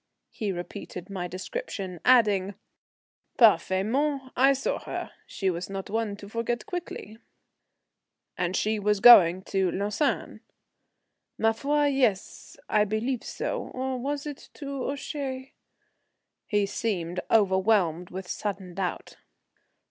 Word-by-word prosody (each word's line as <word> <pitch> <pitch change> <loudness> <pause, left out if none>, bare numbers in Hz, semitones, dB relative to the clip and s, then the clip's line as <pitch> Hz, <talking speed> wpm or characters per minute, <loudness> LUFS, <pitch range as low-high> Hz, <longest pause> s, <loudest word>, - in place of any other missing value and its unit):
He 210 -3 -3
repeated 180 +1 -7
my 180 -2 -3
description, 185 - -5
adding, 205 -6 +4 0.8
"Parfaitement, 240 - +3
I 270 +2 +5
saw 270 - -2
her. - - -6 0.2
She 190 -2 -1
was 175 +2 -5
not 195 0 -6
one 220 -2 -1
to 200 0 -11
forget 230 +2 -2
quickly." 330 - -6 1.2
"And 180 +1 -1
she 215 0 0
was 210 0 +1
going 190 -5 +8
to 190 -1 0
Lausanne?" 205 - -1 1.0
"Ma 225 0 +3
foi, 290 +6 +1
yes, 255 -9 0
I 210 -1 +3
believe 220 +4 -2
so; - - -4
or 260 0 -2
was 280 +3 -3
it 290 -2 -8
to 275 -3 -4
Ouchy?" 275 -2 -5 0.9
He 205 -1 +2
seemed 180 -4 -2
overwhelmed 190 -4 +3
with 190 0 -7
sudden 195 -3 -4
doubt. 180 -1 -4
210 Hz, 120 wpm, -27 LUFS, 190-260 Hz, 1.2 s, going